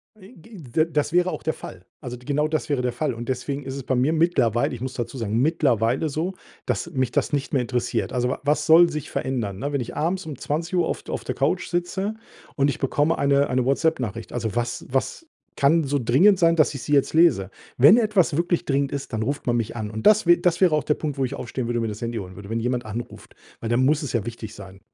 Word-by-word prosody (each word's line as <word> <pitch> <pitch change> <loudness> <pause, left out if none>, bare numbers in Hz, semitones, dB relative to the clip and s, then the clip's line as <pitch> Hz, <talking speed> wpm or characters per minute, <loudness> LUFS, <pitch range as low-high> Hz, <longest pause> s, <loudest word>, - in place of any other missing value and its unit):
I 210 +3 -16
g 210 +6 -14
d 155 0 0
das 150 +2 0
wäre 180 +1 +3
auch - - -6
der 160 - 0
Fall. 90 0 -11 0.2
Also 125 -3 -6
d 125 - -18
genau 150 +2 +1
das 155 -1 -2
wäre 140 -3 +1
der 125 - 0
Fall. 150 +1 -1
Und 120 +2 -7
deswegen 135 +3 -3
ist 135 0 -6
es 140 - -6
bei 130 - -1
mir 130 +6 +2
mittlerweile 155 -10 +2
ich 120 - -7
muss 130 0 -4
dazu 120 +2 -4
sagen, 110 0 -1
mittlerweile 135 -2 +1
so, 165 +6 -2 0.3
dass 170 - -2
mich 130 -5 -1
das - - -1
nicht 140 0 -2
mehr 130 - +3
interessiert. 125 0 -2
Also 125 -1 0
wa - - -3
was 150 +2 +1
soll 170 +2 +7
sich 150 -3 -5
verändern, 110 -7 -3
ne, 145 +1 -3
wenn 140 - 0
ich 115 - -7
abends 180 +5 -1
um 150 -5 -7
20:00 170 +4 -1
auf - - -4
auf - - -4
der - - -4
Couch - - 0
sitze 190 +5 -2 0.4
und 140 0 +2
ich - - -3
bekomme 145 +4 +1
eine 140 0 +3
eine 125 0 +1
WhatsApp-Nachricht. 130 - -1
Also 115 -2 -3
was 120 0 -2
was 135 - -2 0.3
kann 155 +3 +3
so 140 +1 0
dringend 155 - +4
sein, 165 -2 +4
dass 155 -2 +3
ich 130 - -6
sie 150 - -2
jetzt 140 - +3
lese? 130 - +4 0.3
Wenn 145 - +8
etwas 205 -9 +2
wirklich 175 0 0
dringend 140 -1 0
ist, 140 -2 -5
dann 110 0 -1
ruft 140 +5 -3
man 120 -1 +2
mich 115 -1 -3
an. 110 -2 -4
Und 110 0 0
das 215 -1 +5
wä 175 0 +7
das 175 +1 0
wäre 180 -4 +5
auch 150 - 0
der 150 - +2
Punkt, 145 -3 -4
wo 135 - +2
ich 125 - -5
aufstehen 120 0 -4
würde 120 0 -1
und 115 - -1
mir 110 - -1
das 105 - -7
Handy 115 -1 -3
holen 95 -2 -9
würde, 100 +1 -10
wenn 115 +1 -1
jemand 125 0 -1
anruft, 110 +3 -8 0.2
weil 115 - -4
dann 120 +2 +2
muss 150 +2 +2
es 145 - -4
ja 115 -4 0
wichtig 115 -1 -7
sein. 95 -1 -11
135 Hz, 260 wpm, -23 LUFS, 120-160 Hz, 0.4 s, Wenn